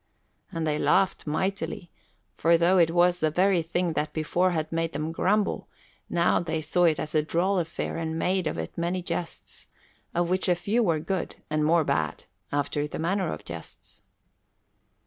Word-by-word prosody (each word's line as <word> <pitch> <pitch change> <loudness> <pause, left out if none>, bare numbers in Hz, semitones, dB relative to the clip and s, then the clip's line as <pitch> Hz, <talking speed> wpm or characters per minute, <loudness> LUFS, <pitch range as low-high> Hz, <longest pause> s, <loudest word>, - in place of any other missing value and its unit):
And 165 -1 -2
they 150 -1 0
laughed 190 -4 +2
mightily, 175 +1 -2 0.4
for 170 - +4
though 175 +3 +4
it 165 -2 +5
was 175 +1 +3
the 155 - +2
very 180 +2 +3
thing 170 +1 -1
that 150 0 -2
before 170 +4 +1
had 160 -3 -2
made 165 0 -1
them 155 +1 -2
grumble, 200 +5 +1 0.4
now 170 0 +3
they 160 -2 -2
saw 170 +3 +2
it 160 -3 +3
as 155 - -4
a 155 - +4
droll 180 +5 +1
affair 165 -1 -3
and 160 -1 -3
made 185 +1 +1
of - - -2
it 80 0 -5
many 175 +2 -1
jests, 175 -1 -5 0.5
of 175 0 +2
which 185 +1 +1
a 175 - +4
few 205 +7 0
were 170 -8 +2
good 180 +3 -3 0.2
and 155 0 +1
more 165 +2 +4
bad, 80 - -1 0.3
after 145 +1 -1
the - - -6
manner 185 +2 0
of - - -7
jests. 85 -1 -9
170 Hz, 180 wpm, -27 LUFS, 155-180 Hz, 0.5 s, it